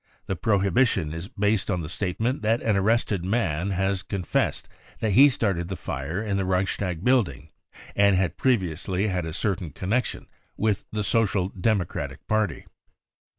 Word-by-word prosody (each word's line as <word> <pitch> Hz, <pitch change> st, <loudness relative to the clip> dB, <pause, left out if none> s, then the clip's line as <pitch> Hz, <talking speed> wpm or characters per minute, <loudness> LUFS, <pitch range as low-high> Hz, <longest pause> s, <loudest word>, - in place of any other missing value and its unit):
The 95 Hz, -, -2 dB
prohibition 100 Hz, -4 st, +2 dB
is 85 Hz, +3 st, -6 dB
based 105 Hz, 0 st, 0 dB
on 90 Hz, -, 0 dB
the 75 Hz, -, -5 dB
state 90 Hz, +1 st, -3 dB
ment 125 Hz, +5 st, 0 dB
that 110 Hz, +2 st, +2 dB
an 110 Hz, -2 st, +2 dB
arrested 100 Hz, -2 st, +1 dB
man 95 Hz, -4 st, 0 dB
has 95 Hz, 0 st, 0 dB
confessed 95 Hz, -1 st, -1 dB, 0.3 s
that 110 Hz, -, 0 dB
he 135 Hz, +9 st, +8 dB
started 95 Hz, -9 st, -1 dB
the 95 Hz, -, -4 dB
fir# 80 Hz, +6 st, -4 dB
in 100 Hz, -3 st, -1 dB
the 95 Hz, -, 0 dB
Reichstag 95 Hz, -1 st, -1 dB
building 115 Hz, -, +1 dB, 0.5 s
and 100 Hz, -1 st, +5 dB
had 95 Hz, -1 st, +1 dB
previously 95 Hz, -, 0 dB
had 90 Hz, -3 st, -2 dB
a -, -, -4 dB
certain 95 Hz, 0 st, -1 dB
connection 105 Hz, -, -2 dB, 0.3 s
with 105 Hz, -2 st, 0 dB
the 105 Hz, -1 st, -2 dB
Social 100 Hz, -4 st, +1 dB
Democratic 100 Hz, -2 st, -2 dB
Paj; 110 Hz, -2 st, +2 dB
ty. -, -, -23 dB
95 Hz, 160 wpm, -25 LUFS, 90-110 Hz, 0.5 s, he